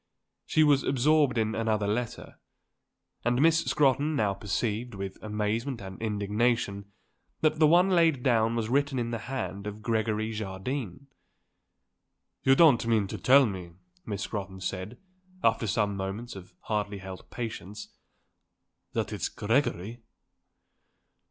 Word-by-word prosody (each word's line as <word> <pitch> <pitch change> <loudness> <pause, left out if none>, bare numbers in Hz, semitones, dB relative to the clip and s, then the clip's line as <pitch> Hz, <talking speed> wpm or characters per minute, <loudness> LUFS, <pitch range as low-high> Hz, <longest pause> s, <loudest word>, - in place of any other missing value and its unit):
She 155 - +4
was 145 -2 +4
absorbed 140 0 +2
in 110 -1 +1
another 110 -2 0
letter. 110 +3 -3 0.8
And 120 +1 +1
Miss 165 +2 +4
Scrotton 145 +2 +2
now 105 -6 +1
perceived, 110 +3 -2
with 95 -1 -6
amazement 110 +4 -2
and 95 0 -9
indignation, 105 -1 -1 0.5
that 155 0 +2
the 155 - +6
one 175 +4 +5
laid 165 -7 +3
down 115 -2 +2
was 115 -2 -1
written 140 +2 +1
in 120 -1 -2
the 115 - -2
hand 105 -6 -4
of 105 +1 -7
Gregory 110 -1 0
Jardine. 110 +3 -5 1.4
"You 135 - +5
don't 135 -8 +5
mean 110 -3 +3
to - - -5
tell 135 +1 +6
me," 90 -5 -5 0.3
Miss 100 -2 -4
Scrotton 95 -3 -5
said, 95 +5 -4 0.5
after 115 0 +2
some 100 0 0
moments 100 +5 -5
of 90 -1 -12
hardly 105 -1 -2
held 95 -1 -9
patience, 105 -3 -6 1.0
"that - - -2
it's - - -2
Gregory?" 115 -1 -1
110 Hz, 130 wpm, -28 LUFS, 100-130 Hz, 1.4 s, the